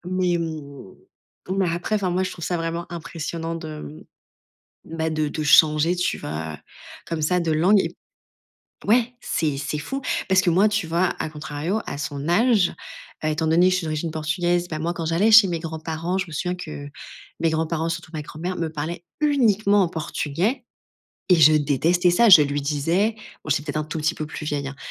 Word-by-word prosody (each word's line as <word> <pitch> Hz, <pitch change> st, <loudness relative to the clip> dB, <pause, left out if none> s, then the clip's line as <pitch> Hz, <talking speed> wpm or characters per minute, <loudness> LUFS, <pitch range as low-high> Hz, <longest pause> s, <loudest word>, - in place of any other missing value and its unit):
Mais, 180 Hz, -1 st, 0 dB
mmh, 150 Hz, -, -6 dB, 0.6 s
mais 190 Hz, -3 st, +1 dB
après, 175 Hz, +5 st, -2 dB
enfin, 195 Hz, -4 st, 0 dB
moi, 185 Hz, +2 st, 0 dB
je -, -, -4 dB
trouve 170 Hz, -, -7 dB
ça 175 Hz, -, -1 dB
vraiment 165 Hz, +1 st, -3 dB
impressionnant 165 Hz, 0 st, -5 dB
de, 155 Hz, -2 st, -7 dB
mmh, 150 Hz, -, -13 dB, 0.8 s
bah, 160 Hz, 0 st, 0 dB
de 155 Hz, -1 st, -1 dB
de 155 Hz, +1 st, -4 dB
changer, 155 Hz, +3 st, +5 dB
tu 180 Hz, -, -1 dB
vois, 75 Hz, 0 st, -5 dB, 0.5 s
comme 165 Hz, -2 st, -3 dB
ça, 180 Hz, +4 st, +2 dB
de 170 Hz, -2 st, -1 dB
langue. 180 Hz, +7 st, +4 dB
Et -, -, -1 dB
b -, -, -17 dB, 0.9 s
ouais, 240 Hz, +3 st, +3 dB
c'est 150 Hz, -9 st, -1 dB
c'est 145 Hz, +2 st, -3 dB
fou 270 Hz, -, -4 dB, 0.3 s
parce 190 Hz, 0 st, +5 dB
que 190 Hz, -2 st, +2 dB
moi, 190 Hz, +5 st, +4 dB
tu 210 Hz, -4 st, -1 dB
vois, 170 Hz, +3 st, +1 dB
à -, -, -2 dB
contrario, 150 Hz, +7 st, -3 dB
à -, -, -5 dB
son 145 Hz, 0 st, -4 dB
âge, 210 Hz, 0 st, +3 dB, 0.5 s
heu, -, -, +2 dB
étant 160 Hz, +1 st, -1 dB
donné 170 Hz, +3 st, +4 dB
que -, -, +3 dB
je -, -, +2 dB
suis 175 Hz, -, -5 dB
d'origine 155 Hz, +1 st, -3 dB
portugaise, 175 Hz, +3 st, -1 dB
bah, 155 Hz, -, -4 dB
moi, 170 Hz, +2 st, -1 dB
quand 165 Hz, -1 st, -4 dB
j'allais 170 Hz, +7 st, +2 dB
chez 215 Hz, -3 st, +8 dB
mes 170 Hz, -2 st, -2 dB
grands 160 Hz, -1 st, -6 dB
parents, 165 Hz, +3 st, -3 dB
je 190 Hz, -1 st, -2 dB
me 165 Hz, -, -12 dB
souviens 180 Hz, +4 st, -2 dB
que 155 Hz, -5 st, -7 dB, 0.5 s
mes 165 Hz, -, +3 dB
grands-parents, 160 Hz, +1 st, -1 dB
surtout 165 Hz, -1 st, -5 dB
ma 155 Hz, -, -3 dB
grand-mère, 170 Hz, +5 st, -5 dB
me 165 Hz, -2 st, -2 dB
parlaient 160 Hz, +3 st, -5 dB, 0.2 s
uniquement 215 Hz, -9 st, +3 dB
en 175 Hz, -, -1 dB
portugais. 170 Hz, -, -2 dB, 0.7 s
Et 180 Hz, -, +7 dB
je 155 Hz, -1 st, +7 dB
détestais 155 Hz, +5 st, +2 dB
ça. 230 Hz, +7 st, +4 dB
Je 180 Hz, -7 st, +10 dB
lui 145 Hz, 0 st, -1 dB
disais, 165 Hz, +9 st, 0 dB, 0.3 s
bon 155 Hz, -, -7 dB
j'étais 150 Hz, 0 st, +2 dB
peut-être 150 Hz, -1 st, -4 dB
un 155 Hz, -, -1 dB
tout 155 Hz, -, -6 dB
petit 160 Hz, +2 st, 0 dB
peu 155 Hz, -, -5 dB
plus 155 Hz, -, -7 dB
vieille, 145 Hz, -2 st, -2 dB
hein, 135 Hz, -, -9 dB
165 Hz, 205 wpm, -23 LUFS, 155-180 Hz, 0.9 s, Je